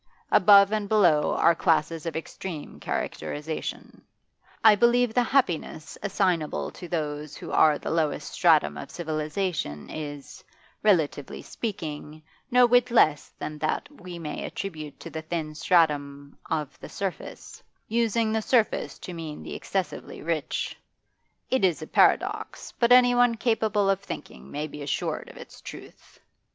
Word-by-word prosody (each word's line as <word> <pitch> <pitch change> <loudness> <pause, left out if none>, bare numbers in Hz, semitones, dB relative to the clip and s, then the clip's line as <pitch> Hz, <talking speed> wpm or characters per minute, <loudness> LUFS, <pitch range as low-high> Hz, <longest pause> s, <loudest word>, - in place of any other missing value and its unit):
Above 200 0 +7
and 210 -2 -1
below 175 -9 +4
are 170 - +5
classes 165 0 0
of 165 - -4
extreme 160 0 -7
characterisation; 150 +2 -5 0.6
I 220 - +9
believe 240 +2 +3
the 245 - +3
happiness 185 - 0
assignable 185 -6 0
to 175 - -10
those 150 -3 -4
who - - -8
are 150 -2 +5
the - - -5
lowest 160 -2 -1
stratum 75 -1 +3
of 75 - -7
civilisation 155 - -3
is, 145 -2 -7 0.4
relatively 160 -9 +1
speaking, 155 -7 -6 0.3
no 250 -1 +6
whit 245 +1 +4
less 155 -11 +3
than 150 0 -6
that 155 - -1
we 180 -11 -10
may 155 -3 -5
attribute 155 -7 -6
to - - -8
the 160 - -5
thin 160 -1 -4
stratum 145 -4 +1
of 150 -3 -3
the - - -10
surface, 195 -2 -6 0.3
using 230 -1 +1
the 220 0 0
surface 225 -1 +1
to 180 - -8
mean 160 -3 -7
the - - -7
excessively 190 -5 -4
rich. 160 -2 -2 0.8
It 260 -3 +2
is 175 -4 +2
a - - -5
paradox, - - +1
but 235 0 +3
anyone 245 -1 +6
capable 220 -3 +1
of 195 -1 +2
thinking 65 - -9
may 150 +1 -3
be 150 -1 -9
assured 140 - -3
of - - -13
its - - -12
truth. - - -12
170 Hz, 140 wpm, -26 LUFS, 150-215 Hz, 0.8 s, I